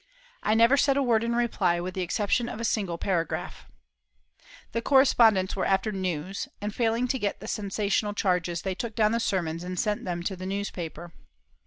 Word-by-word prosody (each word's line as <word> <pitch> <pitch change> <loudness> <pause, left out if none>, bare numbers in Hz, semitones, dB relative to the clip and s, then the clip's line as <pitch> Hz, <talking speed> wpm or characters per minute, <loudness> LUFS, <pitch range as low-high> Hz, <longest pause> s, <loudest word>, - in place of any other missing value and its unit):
I 215 - +2
never 230 +5 +5
said 280 0 +3
a 280 - +2
word 230 -3 +2
in 235 0 0
reply, 200 -7 +1
with 180 +1 -4
the 185 - -3
exception 205 +6 0
of 230 - -6
a - - -4
single 195 -6 -1
paragraph. 170 -3 -2 1.0
The 230 - -1
correspondents 230 -8 +4
were 195 - -1
after 195 +3 +1
news, 185 -1 -3
and, 205 0 -4
failing 230 +1 +1
to 260 - 0
get 205 -2 -2
the 215 - -9
sensational 205 0 -1
charges, 180 -4 0
they 190 - -1
took 220 +3 -5
down 215 -2 +3
the 230 - +1
sermons 170 -6 -1
and 180 0 -4
sent 210 -1 0
them 175 -2 -3
to 190 +2 -2
the 185 0 -6
newspaper. 175 -4 -5
200 Hz, 190 wpm, -27 LUFS, 180-230 Hz, 1.0 s, never